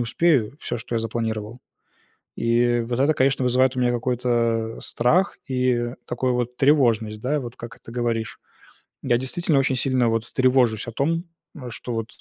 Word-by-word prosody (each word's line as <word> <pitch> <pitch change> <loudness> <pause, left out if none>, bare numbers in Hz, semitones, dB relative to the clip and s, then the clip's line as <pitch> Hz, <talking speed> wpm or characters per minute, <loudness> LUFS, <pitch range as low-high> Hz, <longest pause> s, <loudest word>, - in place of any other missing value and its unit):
успею 125 0 +2
всё, 120 - -3
что 115 - -6
я - - +2
запланировал. 110 0 -3 0.8
И 120 +1 +2
вот 125 +1 -2
это, 150 +3 +4
конечно, 130 -1 +2
вызывает 130 +1 +2
у - - +1
меня 125 -1 +2
какой-то 115 -2 0
страх 175 +12 +1
и 125 -2 0
такую 125 +1 -1
вот 125 0 -2
тревожность, 115 -7 +2
да, 145 +4 0
вот 120 -2 -7
как 115 -1 -10
это 115 - -13
говоришь. 115 -3 -2 0.6
Я 120 - +2
действительно 150 +2 0
очень 135 -1 +1
сильно 125 -2 +1
вот 115 +1 -2
тревожусь 125 -3 +2
о - - -4
том, 165 +8 -1 0.4
что 120 +1 -6
вот, 115 0 -3
120 Hz, 160 wpm, -23 LUFS, 115-130 Hz, 0.8 s, это